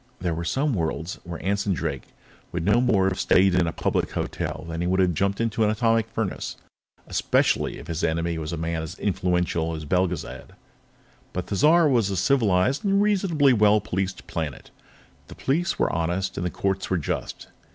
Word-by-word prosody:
There 85 -2 -1
were 85 +1 -3
some 135 - 0
worlds 80 -2 -3
where 85 0 -7
Anson 100 0 +1
Drake - - -4 0.4
would 85 -1 -3
no 105 +5 +4
more 105 -7 +3
have 95 - -5
stayed 95 0 +4
in 90 -2 +2
a - - -1
public - - -1
hotel - - -3
than 85 0 -4
he 85 - 0
would 95 +1 +1
have 90 -2 +3
jumped 100 +3 0
into 115 -1 0
an 105 - +3
atomic 115 +1 +1
furnace, 110 -3 -3 0.5
especially - - +1
if - - -10
his 80 -1 -4
enemy 85 +1 0
was 80 +1 -4
a 85 - -3
man 80 0 -2
as 80 - -7
influential 90 -4 0
as 80 -1 -6
Belgezad. 90 +1 -2 0.8
But 90 - -3
Thizar 155 - +4
was 120 -8 +2
a 95 - -2
civilized 105 - +2
and 200 -1 +2
reasonably 185 -9 +3
well 105 -1 +5
policed 95 -2 -3
planet; 80 -4 -5 0.6
the - - -11
police 170 +7 0
were - - +1
honest 85 +3 -1
and - - -3
the 90 - 0
courts 95 +2 -2
were 95 - +1
just. 80 - -4
95 Hz, 185 wpm, -25 LUFS, 85-115 Hz, 0.8 s, well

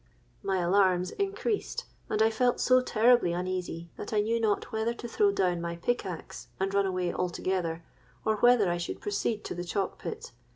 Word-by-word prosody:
My 195 -1 0
alarms 185 0 +3
increased; 405 +2 -2 0.2
and 215 - +2
I 220 - +4
felt 245 +2 +1
so 255 0 +5
terribly 240 -6 +4
uneasy, 175 -2 -3
that - - -6
I 210 -1 +3
knew 230 +2 0
not 215 -1 0
whether 220 +1 -1
to 240 - -7
throw 405 - +3
down 180 - +1
my 170 0 -3
pickaxe 180 -2 -3
and 195 +1 -1
run 200 -1 +3
away 180 -2 -1
altogether, 175 -2 -2 0.4
or 220 -1 +2
whether 240 -2 +5
I 175 - 0
should 175 - -4
proceed 205 +1 -2
to - - -4
the 175 0 -4
chalk 190 +2 -2
pit. 455 +2 -6
200 Hz, 180 wpm, -29 LUFS, 180-235 Hz, 0.4 s, so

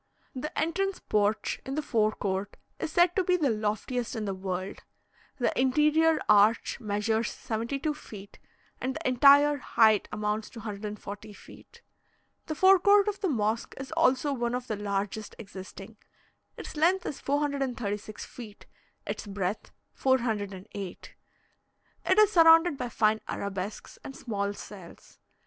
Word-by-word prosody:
The 275 +3 -4
entrance 375 +5 0
porch 210 +1 0
in 270 - -5
the 305 - -2
fore 215 -5 +1
court 195 0 -3 0.2
is - - -3
said 350 +1 +3
to 380 - +2
be 360 0 +2
the 290 -7 +1
loftiest 220 +4 -2
in 220 -2 -3
the 195 - -2
world. 185 0 -4 0.6
The 245 - 0
interior 305 +5 +3
arch 210 +4 +4
measures 220 +1 -1
72 265 +6 -3
feet, 205 -9 -12 0.4
and 260 +1 -2
the - - -3
entire 285 +3 +6
height 220 -5 +3
amounts 210 +1 -2
to 230 - -11
140 210 0 -7
feet. - - -16 0.6
The 310 - -3
fore 380 +3 +6
court 405 +2 +5
of 410 - -5
the 385 - +1
mosque 220 -3 -1
is 270 +2 -7
also 290 -3 +2
one 240 -2 -1
of 250 0 -4
the 220 - -3
largest 205 +1 -3
existing; 195 +1 -10 0.6
its - - -8
length 350 +5 +2
is 285 - -4
436 260 -8 -2
feet, 220 -4 -11 0.4
its - - -5
breadth 195 0 -3 0.2
408; 205 -7 -2 0.9
it - - +3
is 425 -1 +6
surrounded 330 -2 +6
by 250 -2 -4
fine 220 -1 +2
arabesques 200 +1 -5
and 270 - -8
small 200 -3 -3
cells. 190 -5 -12
230 Hz, 140 wpm, -28 LUFS, 205-295 Hz, 0.9 s, entire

